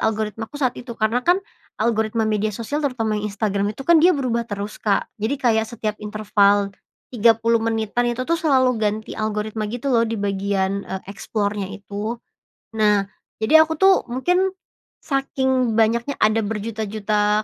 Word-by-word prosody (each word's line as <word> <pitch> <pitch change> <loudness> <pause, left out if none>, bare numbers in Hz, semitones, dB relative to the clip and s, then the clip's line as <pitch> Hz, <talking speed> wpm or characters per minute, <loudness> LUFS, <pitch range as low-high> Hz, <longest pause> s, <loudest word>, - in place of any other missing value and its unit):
algoritmaku 220 +4 -2
saat 255 -4 +1
itu. 240 -2 -8
Karena 225 +3 +1
kan 350 +7 +3 0.4
algoritma 220 0 0
media 215 0 0
sosial, 240 +8 -3
terutama 230 -7 -1
yang 210 - -2
Instagram 200 0 -1
itu, 270 - -7
kan 340 0 +6
dia 350 -1 +5
berubah 235 -3 -1
terus, 205 +1 -5
Kak. 200 -2 +1
Jadi 240 +7 0
kayak 225 -4 +1
setiap 215 -2 -3
interval 205 -1 +2 0.4
30 230 0 +3
menitan 225 +1 0
itu 245 +2 -2
tuh 335 +2 0
selalu 260 -5 +3
ganti 215 +1 -1
algoritma, 215 0 -2
gitu 245 +4 -2
loh, 230 -1 +4
di 225 - -2
bagian, 200 -1 -1
e - - -6
eksplornya 205 -1 -3
itu. 205 +3 -5 0.6
Nah, 210 -2 +4 0.4
jadi 315 +7 +7
aku 320 - -2
tuh 380 -2 +4
mungkin 360 +10 +1 0.5
saking 265 -4 0
banyaknya 235 +5 +2
ada 215 +1 +3
berjuta-juta 210 -1 -1
220 Hz, 150 wpm, -22 LUFS, 210-250 Hz, 0.6 s, jadi